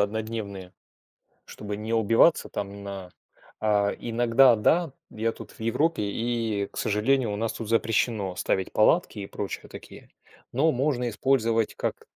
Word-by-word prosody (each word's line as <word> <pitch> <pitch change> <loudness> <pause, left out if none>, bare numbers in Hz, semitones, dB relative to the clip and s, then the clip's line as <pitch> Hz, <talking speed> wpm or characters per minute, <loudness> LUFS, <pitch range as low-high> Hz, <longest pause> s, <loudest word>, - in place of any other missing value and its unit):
однодневные, 105 -3 -3 0.7
чтобы 105 -1 -7
не 110 +2 -5
убиваться 115 +8 +4
там 100 0 -6
на 100 -2 -7 0.5
а 105 -2 +2
иногда, 120 +1 +4
да, 165 +9 +2 0.2
я 115 +1 -1
тут - - -11
в - - -19
Европе, 130 +6 +1
и, 110 -1 -1
к - - -7
сожалению, 115 +3 +1
у - - -2
нас 115 +2 -1
тут 115 - -7
запрещено 110 -3 +1
ставить 95 +1 -1
палатки 115 +3 +3
и 100 - -5
прочие 100 0 -6
такие. - - -12 0.4
Но 155 +6 +3
можно 125 -2 0
использовать 115 -2 +1
как - - -4
110 Hz, 145 wpm, -26 LUFS, 100-120 Hz, 0.7 s, убиваться